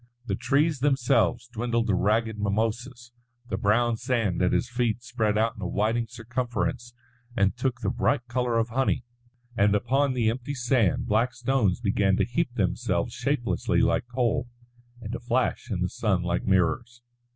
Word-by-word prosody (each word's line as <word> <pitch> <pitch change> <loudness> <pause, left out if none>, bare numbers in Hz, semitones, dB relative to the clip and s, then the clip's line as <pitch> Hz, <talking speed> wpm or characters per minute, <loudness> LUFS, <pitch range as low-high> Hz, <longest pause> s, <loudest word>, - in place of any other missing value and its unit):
The - - -2
trees 145 +1 +1
themselves 130 -3 +2
dwindled 115 -1 -1
to 105 - +1
ragged 110 +3 +1
mimosas, 115 +4 -2 0.4
the 95 - -1
brown 115 +4 +2
sand 115 -7 0
at 90 - +3
his 125 - +1
feet 120 -1 -1
spread 110 -3 0
out 115 +1 +1
in 105 - -10
a 90 - -2
widening 115 +5 0
circumference 120 0 -3 0.4
and 100 +1 +2
took 125 -1 -2
the - - 0
bright 135 -4 0
colour 120 -1 0
of 115 +1 +1
honey; 130 +3 0 0.5
and 105 -1 +3
upon 130 +6 +1
the 115 -3 +2
empty 130 +4 -5
sand 120 -6 +1
black 115 +4 +1
stones 120 -5 +1
began 100 -3 +2
to - - +2
heap 125 +3 -1
themselves 105 0 -1
shapelessly 125 0 0
like - - +1
coal, 125 0 0 0.5
and 105 -1 -6
to - - -4
flash 125 +1 -1
in 95 -5 -2
the 90 - +2
sun 95 -5 0
like 85 0 -1
mirrors. 100 +6 +1
120 Hz, 165 wpm, -26 LUFS, 105-125 Hz, 0.5 s, at